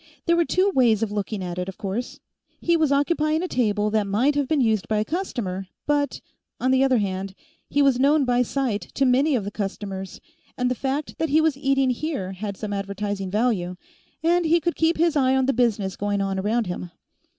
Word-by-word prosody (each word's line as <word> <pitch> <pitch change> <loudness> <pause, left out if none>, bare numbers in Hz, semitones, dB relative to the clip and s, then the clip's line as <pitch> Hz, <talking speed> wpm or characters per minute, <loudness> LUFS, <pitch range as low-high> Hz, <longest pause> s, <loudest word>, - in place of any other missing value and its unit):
There 340 - +3
were 340 0 +3
two 375 +4 +2
ways 230 -6 +3
of 215 - -2
looking 205 -1 -3
at 175 0 -4
it, 180 +1 -3
of 190 - -9
course. 205 +5 -4 0.4
He 340 - +2
was 315 -3 +2
occupying 305 +2 +1
a - - -1
table 210 - 0
that 215 -2 +1
might 235 +9 +2
have 285 -2 0
been 310 0 +1
used 220 -6 +1
by 215 - 0
a 210 - +1
customer, 215 - -3 0.2
but, 290 -2 0 0.4
on 255 - +1
the 260 0 +4
other 265 -2 +3
hand, 195 -2 -2 0.3
he 285 - +2
was 270 -3 +3
known 285 +1 +4
by 245 0 +2
sight 250 -4 -1
to 275 - +2
many 270 +4 +3
of 225 - 0
the 200 - -5
customers, 195 -2 -5 0.4
and 250 0 0
the - - +3
fact 275 +4 -3
that 320 - 0
he 305 +3 +4
was 315 -3 +2
eating 270 -1 +2
here 250 - -3
had 195 +1 -5
some 210 -2 -4
advertising 200 0 -3
value, 205 -4 0 0.5
and 345 +1 +3
he 335 +2 +4
could 340 +1 -1
keep 325 +1 +2
his 335 0 +2
eye 265 -2 +3
on 265 -1 +2
the 275 - +2
business 215 -6 0
going 205 0 -1
on 195 -1 -1
around 220 +4 0
him. 180 -1 -5
245 Hz, 215 wpm, -24 LUFS, 200-285 Hz, 0.5 s, the